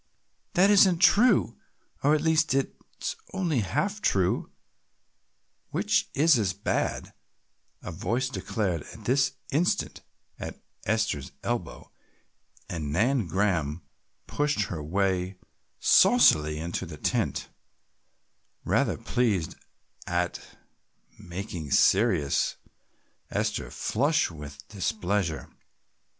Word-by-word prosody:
"That 190 +3 +5
isn't 190 -3 +6
true, 200 - +4 0.4
or 145 +2 +4
at 150 - 0
least 160 -2 +2
it 135 - 0 0.3
is - - -3 0.2
only 170 -8 0
half 200 - -1
true, 95 - +1 1.2
which - - +1
is 150 -2 +5
as 95 -3 0
bad," 100 - -2 0.7
a - - -6
voice 120 +10 -1
declared 100 - -2
at - - -13
this 135 +1 +2 0.2
instant 160 +6 0 0.4
at - - -7 0.3
Esther's 105 -12 -1
elbow, 120 -8 -4 0.8
and 75 -4 -4
Nan 115 - +1
Graham 85 -4 0 0.4
pushed 145 -5 0
her 80 -4 -4
way 95 +3 -1 0.4
saucily 75 0 +5
into 85 +3 -4
the 80 -2 -9
tent, - - -1 1.2
rather - - +1
pleased 110 -9 0 0.5
at 90 0 -1 0.8
making 85 -4 -6
serious 70 +1 +3 0.7
Esther - - -2
flush 145 - 0
with 75 -2 -10
displeasure. 95 -2 -2
100 Hz, 100 wpm, -27 LUFS, 85-140 Hz, 1.2 s, isn't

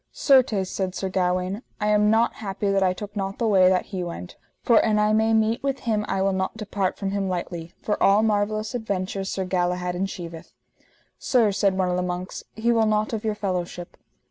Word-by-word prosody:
Certes, 245 -9 +3
said 190 -1 -3
Sir 190 - -2
Gawaine, 185 +2 -1 0.2
I 210 -1 0
am 210 0 +4
not 225 +2 +3
happy 200 -1 -2
that 195 0 +2
I 185 -1 +3
took 205 +3 -7
not 195 -1 -3
the 235 - -1
way 190 -4 +5
that 185 -1 +1
he 185 -1 -2
went, 175 +1 -7 0.3
for 230 -2 +5
an 215 -1 +2
I 210 0 +3
may 220 +1 +3
meet 220 +2 +2
with 275 -1 -2
him 215 -3 0
I 190 - 0
will 195 0 +1
not 190 +3 -2
depart 205 -3 -2
from 195 -1 -3
him 195 -1 -1
lightly, 175 -2 -5
for 210 - -1
all 200 +2 +5
marvellous 215 +1 0
adventures 195 -4 -3
Sir 190 - -2
Galahad 180 -1 -1
enchieveth. 175 -3 -5 0.7
Sir, 235 -6 +3
said 195 -1 +1
one 185 -1 +1
of 180 - 0
the - - 0
monks, 180 0 -4
he 230 +2 +1
will 225 -2 +3
not 215 +1 0
of 220 - -3
your 215 -1 -1
fellowship. 180 -3 -4
195 Hz, 210 wpm, -24 LUFS, 185-215 Hz, 0.7 s, way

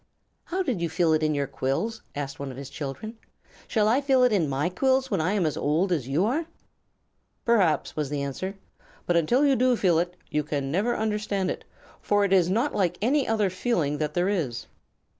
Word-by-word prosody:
"How 375 +2 -1
did 250 - -2
you 170 - 0
feel 160 0 +2
it 155 - +2
in 155 -1 +1
your 140 -1 0
quills?" 140 - -2
asked 140 -1 -5
one 140 -1 -4
of 130 - -8
his 140 -1 -8
children. 155 - -6 0.5
"Shall 215 -2 +2
I 245 +6 +3
feel 265 -2 +3
it 250 - +4
in 170 -8 +2
my 140 +4 0
quills 265 +8 +1
when 195 -5 +1
I 180 +5 +1
am 200 -5 +1
as 155 - 0
old 165 +6 +1
as 150 -8 0
you 150 +8 +1
are?" 305 +9 -1 1.0
"Perhaps," 200 -10 +2
was 150 -3 -2
the 145 -1 -2
answer. 185 +8 -4 0.5
"But 175 - +1
until 235 - +3
you 275 -2 +4
do 255 0 +3
feel 175 -7 +3
it 175 +1 -2 0.2
you 150 - +1
can 140 -2 -3
never 210 +9 +1
understand 210 -3 -1
it, - - -7 0.4
for 205 0 +2
it 195 - +1
is 180 -2 +4
not 230 +9 +1
like 180 -3 0
any 265 +6 +2
other 215 -4 +1
feeling 175 - -1
that 150 -1 -2
there 175 +1 +2
is." 160 - -2
185 Hz, 215 wpm, -26 LUFS, 150-225 Hz, 1.0 s, it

